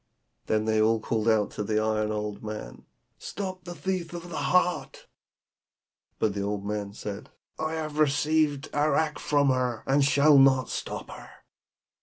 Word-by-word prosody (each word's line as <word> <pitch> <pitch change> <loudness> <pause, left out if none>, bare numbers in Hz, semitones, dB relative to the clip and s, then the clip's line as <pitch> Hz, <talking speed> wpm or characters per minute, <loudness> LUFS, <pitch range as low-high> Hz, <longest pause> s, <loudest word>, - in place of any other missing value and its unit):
Then 110 0 +1
they 110 -1 +2
called 110 0 +1
out 110 -2 +2
to 105 - -4
the 110 +1 0
iron 110 0 0
old 105 -1 -4
man, 105 - -7 0.3
'Stop 185 -3 -6
the 175 -1 -7
thief 185 -3 -3
with 175 0 -7
the - - -5
heart!' 180 -1 +1 1.1
But 105 - 0
the 100 - -3
old 100 0 -3
man 105 -1 -3
said, 105 -1 -7 0.3
'I 155 0 -2
have 155 -1 -4
received 150 0 +2
arrack 150 +1 +1
from 145 -2 +2
her, 125 -3 0
and 140 +1 +3
shall 145 +1 +5
not 130 -2 +4
stop - - -5
her.' - - -11
135 Hz, 155 wpm, -27 LUFS, 110-155 Hz, 1.1 s, shall